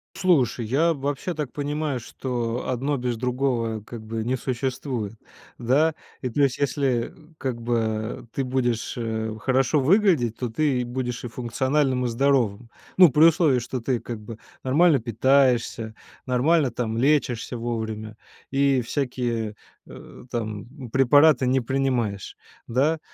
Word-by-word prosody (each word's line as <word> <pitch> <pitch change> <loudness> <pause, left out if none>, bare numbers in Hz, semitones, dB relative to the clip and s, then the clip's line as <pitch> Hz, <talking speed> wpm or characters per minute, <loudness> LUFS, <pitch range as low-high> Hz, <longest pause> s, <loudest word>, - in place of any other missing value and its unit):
Слушай, 130 -10 +2
я 160 +8 +2
вообще 145 +5 -3
так 150 -5 -5
понимаю, 145 -2 -2
что 120 -1 -3
одно 135 +3 -1
без 125 -1 -2
другого, 120 -3 -1
как 110 +1 -9
бы, 110 0 -3
не 125 +2 0
существует. 125 -3 -3 0.4
Да? 145 +7 +2 0.3
И 125 - -2
плюс 140 +1 +1
если, 135 -4 0 0.2
как 125 -3 -4
бы, 110 -1 -2
ты 135 - -1
будешь, 125 -3 -1
э, 110 -2 -2
хорошо 130 +4 +2
выглядеть, 155 - +3
то 125 -2 -3
ты 130 +1 +1
и - - -1
будешь 125 0 -4
и 120 - -5
функциональным, 130 +2 0
и - - 0
здоровым. 120 -3 +1 0.3
Ну, 185 -2 +9
при 150 +4 +4
условии, 160 -6 +5
что 125 +1 -4
ты, 120 0 -1
как 115 -3 -6
бы, 105 +1 -9 0.3
нормально 150 +2 +4
питаешься, 120 -1 +1 0.3
нормально 135 +2 +2
там 115 -2 -3
лечишься 125 -3 +1
вовремя 110 -2 -4 0.3
и 135 -2 +3
всякие, 120 -4 -2 0.3
э, - - -12
там, 120 +3 -5
препараты 135 +1 +5
не 130 0 +2
принимаешь, 120 -6 -1 0.3
да? 145 +7 +1
125 Hz, 135 wpm, -24 LUFS, 115-140 Hz, 0.4 s, Ну